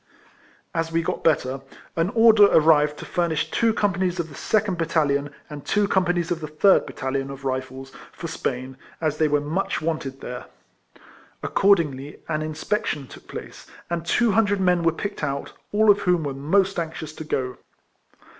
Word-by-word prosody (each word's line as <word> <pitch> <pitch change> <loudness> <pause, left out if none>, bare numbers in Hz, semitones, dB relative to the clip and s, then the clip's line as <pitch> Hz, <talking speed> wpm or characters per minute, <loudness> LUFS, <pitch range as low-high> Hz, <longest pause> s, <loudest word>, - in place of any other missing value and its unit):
As 165 -1 -1
we 165 0 +1
got - - -3
better, 135 -4 +1 0.3
an 165 +2 +1
order 225 -2 +7
arrived 150 -3 +4
to - - -8
furnish 160 -3 -1
two 230 -1 +3
companies 185 -4 0
of 165 -1 -2
the - - -12
second 200 +3 0
bat 165 - 0
talion, 145 -3 +1 0.2
and 145 -2 -8
two 210 -1 +1
companies 175 -2 +1
of 170 - 0
the 155 - -5
third 155 +6 +4
bat - - -9
talion, 135 0 -2
of 135 0 -9
Rifles, 130 0 -4 0.2
for - - -9
Spain, 130 -4 -4 0.2
as 155 -2 -1
they 155 - +4
were 150 0 +2
much 155 +7 -2
wanted 155 -4 -3
there. 125 0 -6 1.0
Accordingly 150 -8 +2
an 155 -1 -1
in 155 0 -3
spection 155 -4 -2
took - - -14
place, - - -9 0.2
and 170 -1 -1
two 230 +6 +2
hundred 205 -1 +2
men 180 -2 +3
were 165 0 +3
picked 200 +2 -5
out, 140 -1 -3 0.2
all 215 0 +5
of 205 - +2
whom 180 -4 +1
were 140 -2 -3
most 185 +8 +1
anxious 160 -2 -5
to 155 - -7
go. 130 -4 -2
160 Hz, 180 wpm, -24 LUFS, 145-185 Hz, 1.0 s, order